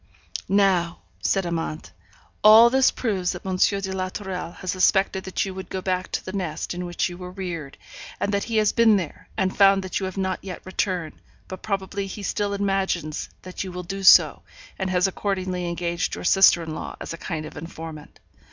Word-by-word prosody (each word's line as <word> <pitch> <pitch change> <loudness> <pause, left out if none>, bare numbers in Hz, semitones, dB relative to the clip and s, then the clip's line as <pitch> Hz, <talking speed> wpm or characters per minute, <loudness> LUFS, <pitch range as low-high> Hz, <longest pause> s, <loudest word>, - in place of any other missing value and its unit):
'Now,' 185 -4 +2 0.2
said 195 -2 +1
Amante, 165 -2 -4 0.5
'all 220 +3 +9
this 265 0 +5
proves 195 -7 -1
that 180 - -9
M. 190 -1 -2
de 195 0 +1
la 185 0 -2
Tourelle 185 -3 -5
has 185 -1 -4
suspected 190 0 +2
that 190 - -1
you 190 - -5
would 190 0 -8
go 190 - -3
back 185 -1 -2
to - - -2
the 185 - -6
nest 175 -6 -3
in 180 0 -4
which 175 - -1
you 175 -1 -8
were 180 0 -7
reared, 175 -6 -6 0.4
and 205 - -1
that 200 - 0
he 225 -1 -1
has 215 -1 +3
been 225 -3 +5
there, 170 -6 -6
and 185 0 0
found 195 -1 +5
that 185 - -2
you 190 - -2
have 185 - -7
not 190 -1 -2
yet 185 -3 -8
returned; 185 -3 -3 0.3
but 185 -1 -8
probably 195 -1 -3
he 200 +2 -7
still 200 +1 -1
imagines 195 -6 -1
that 185 +1 -5
you 190 - -6
will 180 0 -6
do 195 +3 -5
so, 190 - +7 0.4
and 190 -1 -1
has 180 -1 +2
accordingly 185 -2 -2
engaged 170 0 -2
your - - -7
sister 180 -2 +5
in 160 -1 -5
law - - -6
as - - -6
a - - -4
kind 160 -4 -4
of - - -10
informant. 160 -1 -9
185 Hz, 205 wpm, -24 LUFS, 175-195 Hz, 0.5 s, all